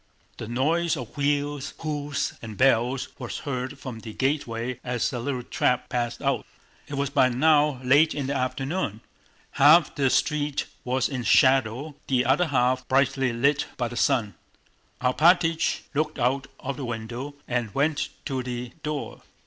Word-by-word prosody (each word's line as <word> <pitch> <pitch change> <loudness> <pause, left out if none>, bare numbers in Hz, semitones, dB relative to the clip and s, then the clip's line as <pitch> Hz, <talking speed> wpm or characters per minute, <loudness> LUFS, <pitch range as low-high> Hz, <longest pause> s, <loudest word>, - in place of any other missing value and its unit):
The - - -6
noise 160 +8 +1
of 125 -4 -8
wheels, 145 -1 -1
hoofs, 145 -2 -2
and 110 -3 -8
bells 130 0 +2
was 125 -3 -5
heard 130 0 -4
from 130 -4 -7
the 110 -1 -9
gateway 125 -3 -2
as 125 +1 -1
a 125 - -2
little 125 0 -3
trap 125 +1 0
passed 120 -1 -2
out. - - +1 0.4
It 145 - -5
was 140 0 -1
by 130 - +4
now 150 +1 +3
late 145 +5 +4
in 145 -2 -2
the 140 - -1
afternoon. 135 - -2 0.5
Half 155 +4 +6
the 135 -2 +1
street 150 +1 0 0.2
was 130 0 0
in 130 -3 -4
shadow, 130 +4 +3
the 130 -2 +2
other 145 +8 +3
half 130 -2 +1
brightly 135 -1 +2
lit 140 +5 +1
by 120 -2 -1
the 120 - -8
sun. 120 -7 +1 0.7
Alpátych 165 +5 +3
looked 155 +1 -1
out 135 +2 0
of 135 -1 -4
the 135 - -4
window 120 +5 -5
and 120 -3 -1
went 145 +2 +1 0.2
to 135 -3 -2
the 125 -1 -5
door. 150 -2 -4
135 Hz, 155 wpm, -25 LUFS, 125-145 Hz, 0.7 s, Half